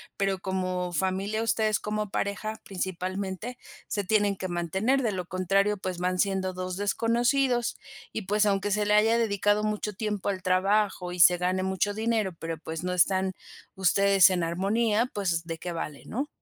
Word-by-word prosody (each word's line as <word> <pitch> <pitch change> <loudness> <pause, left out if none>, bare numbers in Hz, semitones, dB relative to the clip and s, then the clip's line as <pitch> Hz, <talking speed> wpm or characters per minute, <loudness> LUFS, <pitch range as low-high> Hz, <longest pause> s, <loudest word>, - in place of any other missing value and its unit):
pero 195 -1 0
como 185 -1 -2
familia, 195 +5 -1
ustedes 220 -1 +1
como 210 -1 -3
pareja, 215 +2 -3
principalmente 190 +4 -4 0.3
se 205 -2 -2
tienen 205 -1 +2
que 185 - -4
mantener 190 +10 0
de 230 -4 0
lo 185 -2 -4
contrario, 195 +3 +1
pues 185 -2 -4
van 180 +1 -1
siendo 190 -1 0
2 185 0 -4
desconocidos. 240 +4 +1 0.4
Y 220 - -2
pues, 210 +2 +1
aunque 200 0 +1
se 210 +1 +1
le 210 - +2
haya 220 +2 +4
dedicado 205 -1 +1
mucho 210 0 -2
tiempo 210 -1 -3
al 190 -2 -2
trabajo 185 0 +1
y 180 - -6
se 175 +1 +7
gane 185 +1 0
mucho 190 +2 0
dinero, 220 -2 0
pero, 165 0 -4
pues, 160 +2 -6
no 180 - -1
están 190 +1 +2 0.4
ustedes 195 0 +5
en 180 -2 0
armonía 210 +7 +1
pues 175 -5 -1
de 165 -1 -5
qué 175 +2 -5
vale, 150 -3 -5
¿no? 270 +6 -3
195 Hz, 170 wpm, -27 LUFS, 185-210 Hz, 0.4 s, se